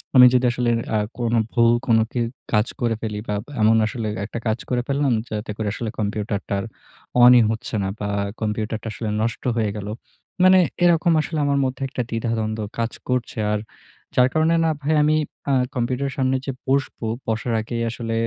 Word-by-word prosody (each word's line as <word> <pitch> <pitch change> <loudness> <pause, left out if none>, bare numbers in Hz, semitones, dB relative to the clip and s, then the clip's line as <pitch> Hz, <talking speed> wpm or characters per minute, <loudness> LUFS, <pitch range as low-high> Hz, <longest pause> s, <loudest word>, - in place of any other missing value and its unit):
আমি 125 -1 +10
যদি 125 0 +3
আসলে 120 0 0 0.3
আ - - +4 0.2
কোন 120 -1 0 0.2
ভুল 115 -1 +4 0.2
কোনো 115 -1 +5
কে 125 - -2 0.3
কাজ 105 +2 +3
করে 115 -2 +1
ফেলি 105 -2 -3
বা 105 - -1 0.3
এমন 110 +1 +5
আসলে 110 0 -3 0.2
একটা 110 - -5
কাজ 110 +2 0
করে 125 -1 +1
ফেললাম 140 -2 +1 0.2
যাতে 105 0 -4
করে 110 -2 -2
আসলে 115 +1 -4
কম্পিউটারটা 105 0 -2
আর 100 - -4 0.6
অনই 125 0 +9
হচ্ছে 110 0 -4
না 95 - -1
বা 105 - -2 0.3
কম্পিউটারটা 110 +1 -2
আসলে 110 0 -4
নষ্ট 115 +1 -2
হয়ে 110 -2 +1
গেলো। 105 0 -5 0.5
মানে 185 0 +7 0.2
এরকম 170 0 +4
আসলে 155 +1 -3
আমার 140 0 +2
মধ্যে 130 +1 -4
একটা 130 - -3
দ্বিধা-দ্বন্দ্ব 115 -1 -2 0.2
কাজ 115 0 -1 0.2
করছে। 125 -2 -1 0.2
আর 105 - 0 0.6
যার 125 0 +5
কারণে 160 +1 +3
না - - +3
ভাই 155 +3 +1
আমি 150 +1 +3 0.4
আ - - +3 0.2
কম্পিউটারের 130 +3 -1
সামনে 130 0 +1
যে 135 - -2 0.2
বসব, 135 0 0 0.3
বসার 115 +1 -1
আগেই 115 +1 -4
আসলে 115 0 -4
115 Hz, 180 wpm, -22 LUFS, 110-130 Hz, 0.6 s, আমি